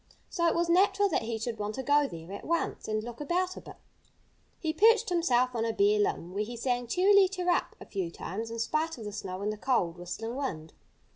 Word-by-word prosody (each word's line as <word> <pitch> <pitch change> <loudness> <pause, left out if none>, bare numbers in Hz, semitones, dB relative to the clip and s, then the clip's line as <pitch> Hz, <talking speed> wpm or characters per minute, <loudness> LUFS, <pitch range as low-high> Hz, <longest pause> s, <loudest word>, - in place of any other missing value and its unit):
So 340 -3 +1
it 330 - +2
was 340 0 +1
natural 390 +3 +4
that 325 - +1
he 225 0 -3
should 225 0 -4
want 210 +1 -3
to 265 - -4
go 290 +1 +3
there 165 -4 -9
at 200 - -7
once 335 +1 -2
and 215 0 -1
look 240 +3 -8
about 360 +5 0
a - - -8
bit. - - -11 0.8
He 315 -2 -2
perched 450 +5 +5
himself 255 -8 +2
on 230 -2 -1
a 230 - 0
bare 205 +1 +3
limb, 180 -3 -1
where 205 +2 0
he 235 +3 -7
sang 245 0 -1
"Cheerily 385 - +5
cheerup" 360 -2 0
a - - -10
few 190 -4 -3
times, 215 +6 -5
in 230 - -5
spite 310 +7 -1
of 225 - -8
the 210 - -4
snow 195 -2 -5
and 210 +1 0
the - - -8
cold, 185 -8 0
whistling 225 +7 -5
wind. 165 - -4
240 Hz, 230 wpm, -29 LUFS, 210-335 Hz, 0.8 s, perched